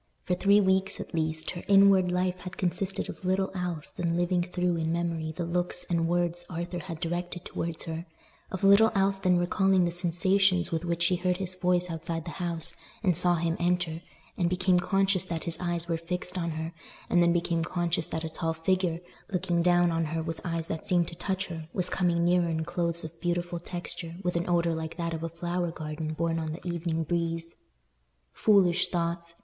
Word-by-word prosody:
For 180 - 0
three 200 +3 +5
weeks, 190 -1 +2
at - - -7
least, 160 -1 -1
her 175 - -6
inward 195 -2 +6
life 180 0 0
had 180 0 -8
consisted 185 +2 -1
of - - -8
little 190 +1 +1
else 180 -5 -3
than 170 -1 -1
living 175 0 +2
through 180 -1 0
in 160 0 -1
memory 165 -2 -1
the 165 +2 -4
looks 175 +1 -1
and 165 -1 +2
words 175 0 0
Arthur 175 +1 -4
had 170 -2 -7
directed 175 +1 -3
towards 165 -1 -4
her—of 165 +3 -8
little 200 +3 +7
else 195 0 +2
than 180 -2 +3
recalling 185 +1 +3
the 170 - 0
sensations 180 +1 +2
with 165 0 -1
which 170 0 0
she 180 +1 +3
heard 180 0 0
his 185 -1 -1
voice 180 -1 +1
outside 165 0 -4
the 170 - -5
house, 170 -1 -2 0.3
and 180 -4 +3
saw 175 +1 +4
him 165 0 0
enter, 175 -2 0 0.4
and 175 -1 +2
became 185 0 +3
conscious 195 0 +2
that 165 -3 -4
his 170 -1 -2
eyes 175 -1 -2
were 165 -1 0
fixed 180 +2 -4
on 170 -2 -1
her, 160 +1 -4 0.3
and 175 - +4
then 170 0 +5
became 170 -1 +1
conscious 170 -1 -1
that 160 - -4
a - - -2
tall 165 0 -2
figure, 175 0 0 0.3
looking 175 -2 +1
down 175 0 +4
on 165 0 0
her 160 +1 -2
with 165 0 -5
eyes 165 -2 -2
that 160 -1 -4
seemed 175 -2 +2
to 170 - -9
touch 190 +2 -2
her, 160 -3 -7
was 180 -2 +2
coming 175 -2 +2
nearer 175 -1 +3
in 160 -1 -1
clothes 170 -1 0
of 160 +1 -9
beautiful 175 0 -1
texture 175 -1 -5
with 180 -1 -1
an 170 +1 -1
odour 170 -1 +2
like 160 0 -5
that 170 -1 -2
of 160 - -4
a 165 - -3
flower 175 +1 -2
garden 155 -1 -4
borne 165 0 0
on 160 -1 -3
the 175 - -8
evening 170 -1 -1
breeze. 165 0 -2 0.8
Foolish 185 -4 +4
thoughts! 170 -1 -2
175 Hz, 200 wpm, -28 LUFS, 165-180 Hz, 0.8 s, little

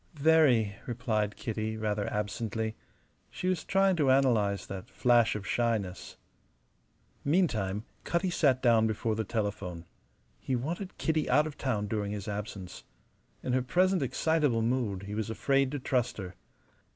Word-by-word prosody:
"Very," 140 -10 +4
replied 110 -4 -1
Kitty, 110 -1 -3
rather 105 -1 -1
absently. 110 +2 -2 0.5
She 185 - -4
was 185 -3 0
trying 195 -1 +3
to 145 -4 +3
analyze 115 -7 +3
that 95 -1 -7
flash 120 -3 +3
of 105 -2 -5
shyness. 110 -6 -1 1.1
Meantime, 115 - +1 0.2
Cutty 175 +2 0
sat 135 -7 +2
down 115 -3 +5
before 110 +1 -1
the 110 +1 -1
telephone. 100 -6 -3 0.5
He 130 - -2
wanted 170 +10 -4
Kitty 160 -2 0
out 145 +4 +4
of 155 -2 -6
town 110 -6 -1
during 105 -1 -2
his 100 -1 -5
absence. 100 -3 -6 0.6
In 125 - -1
her 130 - +3
present 180 +8 +2
excitable 135 -2 +1
mood 115 -5 -1
he 100 +1 -6
was 110 0 -2
afraid 135 +4 +1
to - - -1
trust 125 -2 0
her. 95 -3 -6
115 Hz, 145 wpm, -30 LUFS, 105-140 Hz, 1.1 s, down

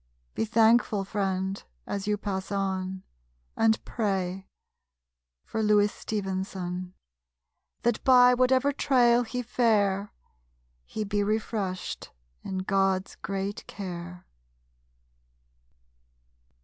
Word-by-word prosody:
Be - - -1
thankful, 225 -2 +3
friend, 190 -1 -2 0.2
as 200 0 -4
you 210 0 +1
pass 195 -2 -4
on, 190 -1 -2 0.5
And 225 0 +2
pray 195 -4 -2 1.0
for 220 - -3
Louis 210 -1 +4
Stevenson, 185 -3 -4 0.9
That 240 -1 +1
by 250 -1 +7
whatever 255 +2 +3
trail 245 -4 +4
he 250 +1 -3
fare 210 -4 +1 0.7
He 215 - -4
be 205 0 0
refreshed 210 -3 -2 0.3
in 190 -1 -4
God's 195 -1 +1
great 195 +1 -4
care! 180 -2 -7
200 Hz, 90 wpm, -27 LUFS, 190-225 Hz, 1.0 s, by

